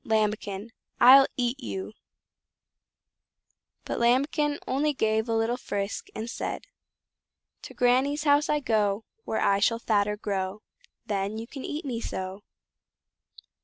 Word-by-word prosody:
Lambikin! 215 -1 -1 0.3
I'll 270 +2 +9
EAT 245 +1 0
YOU!" 195 -3 -5 1.9
But - - -3
Lambikin 285 +5 +2
only 295 +3 +1
gave 220 0 +1
a 225 - +1
little 225 +2 +1
frisk, 200 -4 -4
and 220 - -4
said: 240 - -4 1.0
"To - - -11
Granny's 265 +4 +2
house 290 0 +3
I 300 0 +1
go, 215 -4 +1 0.2
Where 220 - -1
I 200 0 +3
shall 230 +3 +2
fatter 210 -2 +1
grow, 195 0 -3 0.4
Then 200 +1 -2
you 225 - -5
can 265 +2 -9
eat 300 +2 -5
me 240 -4 -3
so." 190 -1 -5
230 Hz, 130 wpm, -27 LUFS, 205-265 Hz, 1.9 s, I'll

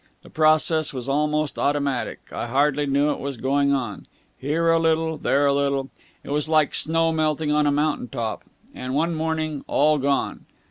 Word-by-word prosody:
The - - -15
process 155 -1 +2
was 125 0 -5
almost 150 0 0
automatic. 140 -3 -1
I - - -4
hardly 145 +3 +1
knew 140 +2 +2
it - - -4
was 140 -2 -5
going 140 +3 +1
on. 120 -8 -3 0.3
Here 155 +5 -1
a 165 - +3
little 160 0 +1
there 140 +1 +2
a 140 - +3
little. 140 -1 -1 0.3
It - - -8
was 150 +1 0
like 155 -2 +3
snow 165 +1 +2
melting 155 -1 0
on 150 0 +2
a - - +3
mountain 145 -2 0
top. 115 -2 -4 0.3
And 130 +1 -5
one 165 +3 +1
morning 155 -2 -2
all 150 +1 +2
gone!" 140 0 -1
145 Hz, 180 wpm, -23 LUFS, 140-155 Hz, 0.3 s, a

